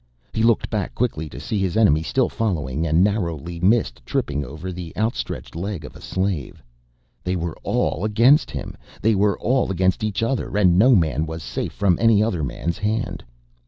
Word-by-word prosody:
He 110 - -1
looked 115 -1 +2
back 105 -4 -2
quickly 80 -11 -1
to - - -9
see 105 - -2
his 95 -1 0
enemy 100 -9 +4
still 130 +10 +1
following 80 - -2
and 80 +3 +4
narrowly 85 -5 -1
missed 90 - +2
tripping 70 +3 -1
over 80 +8 -7
the 85 -2 -7
outstretched 110 -5 -3
leg 90 -2 -4
of - - -11
a - - -12
slave. 95 -7 -3 0.6
They 90 +1 -1
were 85 -2 -3
all - - -1
against 115 +8 +4
him! - - -6 0.3
They 110 +1 +4
were 100 0 +2
all 130 0 +1
against 95 +3 +1
each 110 0 -1
other 115 -3 -1
and 90 -4 +5
no 120 +7 +6
man 80 -4 +1
was 80 0 -6
safe - - -4
from 95 -4 +2
any 115 -2 +5
other 90 -8 -1
man's 85 +4 -3
hand. 110 +2 -2
95 Hz, 185 wpm, -22 LUFS, 80-110 Hz, 0.6 s, no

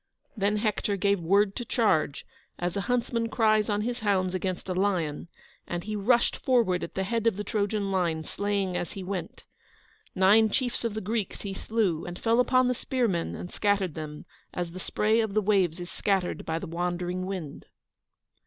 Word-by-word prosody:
Then 210 0 +1
Hector 210 -1 0
gave 200 -1 +2
the 165 - -7
word 200 +1 +4
to 240 - -3
charge, 210 - +1 0.3
as 175 0 -2
a 200 - 0
huntsman 235 -1 0
cries 215 -2 +3
on 205 0 +1
his 240 +2 -2
hounds 190 -4 +1
against 185 0 -3
a 185 - -1
lion, 180 -6 0 0.4
and 175 0 -3
he 215 0 -4
rushed 235 +4 +2
forward 230 -9 +2
at - - -7
the 190 - 0
head 230 +3 0
of 225 - +3
the 210 - -2
Trojan 205 -1 -1
line, 170 -4 0
slaying 200 0 -1
as 175 - -3
he 195 - -6
went. 185 -1 -5 0.7
Nine 205 +4 +5
chiefs 245 +2 -1
of 230 -3 -2
the 215 - -2
Greeks 215 0 -2
he 200 -2 -4
slew, 195 -5 0
and 175 0 -6
fell 230 +3 +2
upon 255 0 +4
the 250 - +2
spearmen 235 -9 -1
and 180 - -7
scattered 200 -5 +1
them, 150 -1 -7 0.3
as 175 -1 -2
the 185 - -8
spray 215 +4 +1
of 220 -3 -1
the - - +5
waves 190 -5 +2
is 175 0 -7
scattered 195 -3 -1
by 160 0 0
the 165 - -5
wandering 180 +1 -2
wind. 180 -7 -6
200 Hz, 190 wpm, -28 LUFS, 180-220 Hz, 0.7 s, Nine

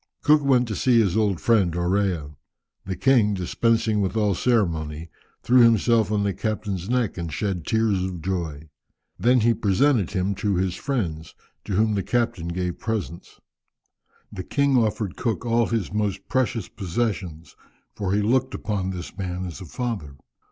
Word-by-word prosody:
Cook 150 0 +5
went 125 -3 +3
to 105 - -2
see 120 +4 +3
his 100 -6 +2
old 105 -5 +1
friend 100 -8 +2
Orea. 90 -4 -1 0.5
The 95 - -2
king, 110 -1 +3
dispensing 110 +3 +1
with 100 +3 -1
all 105 -2 +2
ceremony, 85 -8 -1 0.3
threw 125 +5 +4
himself 115 -1 +4
on 105 -1 +1
the 100 -1 0
captain's 100 -2 -3
neck, 125 -6 0
and 85 -2 -4
shed 95 -3 -3
tears 110 -4 +1
of 95 -2 -4
joy; 80 -4 -4 0.5
then 125 +1 +4
he 115 +1 +4
presented 110 - +2
him 95 0 -1
to 100 -2 +1
his 90 0 0
friends, 90 - -3 0.3
to 105 - -4
whom 110 +3 +2
the 100 - 0
captain 115 -6 -1
gave 90 0 -3
presents. 105 -7 -5 0.9
The 95 - -6
king 140 +6 +1
offered 110 -5 0
Cook 115 0 -2
all 115 0 +2
his 110 -5 -2
most 105 -2 -2
precious 125 -6 0
possessions, 95 -4 -4 0.4
for 100 -3 -3
he 105 +1 +1
looked 125 +4 +1
upon 100 -3 -2
this 90 -2 -6
man 90 -2 -4
as 90 +2 -7
a - - -7
father. 100 - -4
100 Hz, 165 wpm, -24 LUFS, 90-115 Hz, 0.9 s, Cook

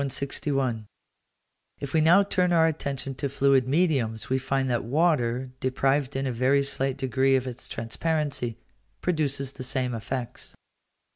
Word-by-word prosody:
161. 135 -4 -2 0.9
If 140 -2 -6
we 160 - +4
now 175 +6 +6
turn 180 -2 +1
our 165 -2 +5
attention 140 -4 -2
to 140 +2 -3
fluid 135 -1 +3
mediums, 130 -8 0
we 130 - +2
find 135 0 -1
that 120 -2 0
water, 130 -3 +1
deprived 135 +1 0
in 135 +1 -1
a 130 - -1
very 130 +4 +2
slight 135 -1 -1
degree 130 +1 +2
of 130 -1 0
its 125 -1 -6
transparency, 135 0 -2 0.4
produces 140 -6 0
the 130 - -7
same 125 -1 -1
effects. 120 +1 -5
135 Hz, 145 wpm, -26 LUFS, 125-145 Hz, 0.9 s, now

